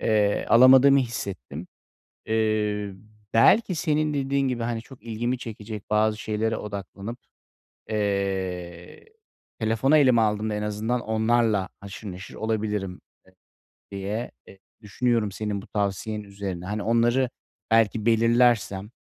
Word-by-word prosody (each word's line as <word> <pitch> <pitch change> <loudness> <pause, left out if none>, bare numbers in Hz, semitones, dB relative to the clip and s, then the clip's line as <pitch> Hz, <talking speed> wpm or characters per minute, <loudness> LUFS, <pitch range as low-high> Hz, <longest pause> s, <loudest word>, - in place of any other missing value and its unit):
Eee, 105 -2 +1
alamadığımı 130 +3 +7
hissettim. 95 - -4 0.6
Eee, 105 -2 0 0.4
belki, 185 - +5
senin 155 -1 0
dediğin 140 -1 0
gibi, 120 -2 -2
hani, 115 -1 -2
çok 120 -2 -16
ilgimi 120 +2 -2
çekecek 110 -3 -8
bazı 105 0 +2
şeylere 110 +1 -1
odaklanıp, 100 +2 -7 0.7
eee, 95 -4 -3 0.5
telefonu 115 +7 +3
elime 130 -5 +5
aldığımda 105 0 0
en 105 - -3
azından 110 +4 -2
onlarla 110 -3 +1
haşır 100 0 -8
neşir 90 -1 -10
olabilirim 105 -4 -2 0.3
e - - -19 0.6
diye, 100 +4 -4 0.2
e 95 - -14 0.2
düşünüyorum 110 0 0
senin 105 -1 -3
bu - - -14
tavsiyen 105 +1 -2
üzerine. 100 -3 -6
Hani, 105 +1 -3
onları 120 +3 +2 0.4
belki 115 0 +2
belirlersem, 115 -3 +3
110 Hz, 115 wpm, -25 LUFS, 100-120 Hz, 0.7 s, alamadığımı